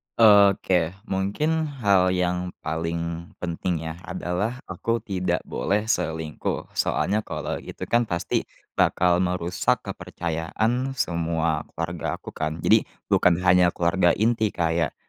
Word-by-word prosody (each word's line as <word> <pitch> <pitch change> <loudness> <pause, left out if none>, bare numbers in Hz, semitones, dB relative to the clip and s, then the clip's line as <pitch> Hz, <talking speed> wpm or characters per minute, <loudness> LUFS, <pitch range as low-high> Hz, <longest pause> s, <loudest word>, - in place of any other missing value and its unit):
Oke, 100 -5 +5
mungkin 150 +12 0
hal 100 -10 +2
yang 90 0 0
paling 85 +1 -3 0.2
penting, 85 -1 -2
ya, 80 +1 -6
adalah 90 +7 -2
aku 115 +5 -2
tidak 90 -4 -1
boleh 105 +2 -1
selingkuh. 80 -7 -2
Soalnya 105 +3 +1
kalau - - -4
itu, - - -8
kan, 120 -1 +2
pasti 85 -1 -1 0.3
bakal 90 0 +3
merusak 90 -1 0
kepercayaan 110 +11 -2
semua 85 - 0
keluarga 85 0 -3
aku, - - -10
kan. 80 +1 -3
Jadi - - +4 0.2
bukan 90 -2 +5
hanya 90 -1 +5
keluarga 85 +1 +2
inti 110 0 +2
kayak, 85 -2 0
90 Hz, 120 wpm, -24 LUFS, 85-100 Hz, 0.3 s, Oke